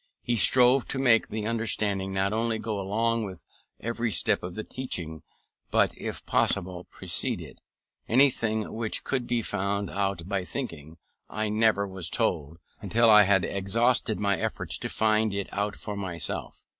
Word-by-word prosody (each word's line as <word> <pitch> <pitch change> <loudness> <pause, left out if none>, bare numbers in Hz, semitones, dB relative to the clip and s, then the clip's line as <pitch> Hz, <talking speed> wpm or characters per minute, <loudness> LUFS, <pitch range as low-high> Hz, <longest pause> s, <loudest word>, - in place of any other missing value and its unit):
He 120 - 0
strove 125 +3 +5
to - - -3
make 120 -4 +4
the 105 0 -4
understanding 105 -4 -1
not 95 +1 0
only 115 0 0
go 110 -2 -3
along 115 +4 0
with 95 -3 -8 0.3
every 115 +1 -2
step - - +2
of 90 0 -7
the 110 - -4
teaching, 85 -13 -5 0.5
but, - - +2
if - - -6
possible, 90 0 +1
precede - - -1
it. - - -12 0.5
Anything 115 -4 +2
which 110 -1 -1
could 130 -3 -2
be 120 -1 0
found 100 0 -2
out 100 -4 -2
by 100 -2 -1
thinking 80 - -6 0.3
I 110 0 -2
never 105 -2 +2
was 95 -3 -4
told, 85 -9 -1 0.2
until 115 0 +3
I 105 -1 +8
had 95 -1 +3
exhausted 110 +2 +1
my 100 -3 +1
efforts - - -3
to - - -4
find 110 -1 +1
it 100 -1 -3
out 105 +1 -2
for 105 - -6
myself. 90 -6 -4
105 Hz, 160 wpm, -27 LUFS, 95-115 Hz, 0.5 s, I